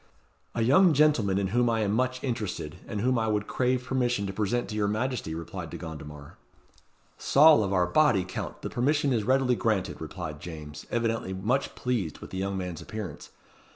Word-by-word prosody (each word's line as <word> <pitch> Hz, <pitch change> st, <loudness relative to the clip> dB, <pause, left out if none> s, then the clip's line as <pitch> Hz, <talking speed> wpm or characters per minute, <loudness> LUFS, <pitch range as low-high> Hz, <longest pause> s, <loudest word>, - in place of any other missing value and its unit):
"A 115 Hz, -, +1 dB
young 165 Hz, +8 st, +5 dB
gentleman 130 Hz, -10 st, +3 dB
in 100 Hz, -1 st, 0 dB
whom 120 Hz, +3 st, +2 dB
I 115 Hz, -1 st, +1 dB
am 100 Hz, -2 st, +1 dB
much 130 Hz, +3 st, 0 dB
interested, 105 Hz, -, -3 dB
and 105 Hz, -3 st, -3 dB
whom 125 Hz, 0 st, +2 dB
I 110 Hz, -, 0 dB
would 105 Hz, -1 st, 0 dB
crave 125 Hz, +1 st, 0 dB
permission 125 Hz, -5 st, 0 dB
to 95 Hz, -, -4 dB
present 110 Hz, +4 st, -1 dB
to 105 Hz, -, -5 dB
your 105 Hz, -1 st, +1 dB
Majesty," 110 Hz, -5 st, -2 dB
replied 85 Hz, 0 st, -6 dB
De -, -, -7 dB
Gondomar. 75 Hz, -2 st, -9 dB, 0.8 s
"Saul 150 Hz, -5 st, +6 dB
of 100 Hz, -, -2 dB
our 90 Hz, -2 st, +3 dB
body, 115 Hz, -1 st, +3 dB
Count, 90 Hz, -, -6 dB
the -, -, -3 dB
permission 140 Hz, +2 st, +1 dB
is 110 Hz, -3 st, +1 dB
readily 130 Hz, +1 st, +3 dB
granted," 110 Hz, -8 st, -1 dB
replied 80 Hz, -1 st, -6 dB
James, 75 Hz, -2 st, -9 dB
evidently 115 Hz, -4 st, -1 dB
much 110 Hz, +9 st, -1 dB
pleased 115 Hz, -11 st, -2 dB
with -, -, -11 dB
the 95 Hz, -, -4 dB
young 100 Hz, 0 st, -2 dB
man's 90 Hz, -3 st, -5 dB
appearance. 100 Hz, -3 st, -7 dB
110 Hz, 190 wpm, -28 LUFS, 95-125 Hz, 0.8 s, Saul